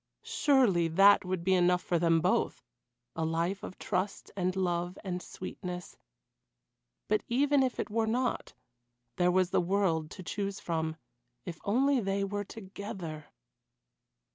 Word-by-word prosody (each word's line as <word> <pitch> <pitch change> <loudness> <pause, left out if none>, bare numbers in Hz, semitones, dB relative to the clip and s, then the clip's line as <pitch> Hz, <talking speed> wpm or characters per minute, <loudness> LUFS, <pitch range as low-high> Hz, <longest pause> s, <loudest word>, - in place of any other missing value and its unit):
Surely 240 - +3
that 195 +6 +6
would 185 -2 -3
be 190 +1 +3
enough 180 0 +3
for 175 -2 0
them 165 -1 +3
both - - +1 0.5
a 160 - -1
life 170 +4 -1
of - - -8
trust 195 0 -3
and 185 -1 -1
love 175 -1 -1
and 180 -2 -3
sweetness; 180 -1 -7 1.1
but - - +2
even 280 +3 +3
if 255 -2 0
it - - -3
were 225 0 +1
not 245 +2 -1 0.6
there 180 0 +3
was 185 0 +2
the - - +3
world 175 -4 +1
to 185 - -9
choose 200 +2 -3
from, 160 -2 -2 0.5
if 170 -3 -6
only 265 +6 +3
they 195 -2 -1
were 205 +1 -2
together. 190 -7 -7
185 Hz, 140 wpm, -30 LUFS, 175-205 Hz, 1.1 s, that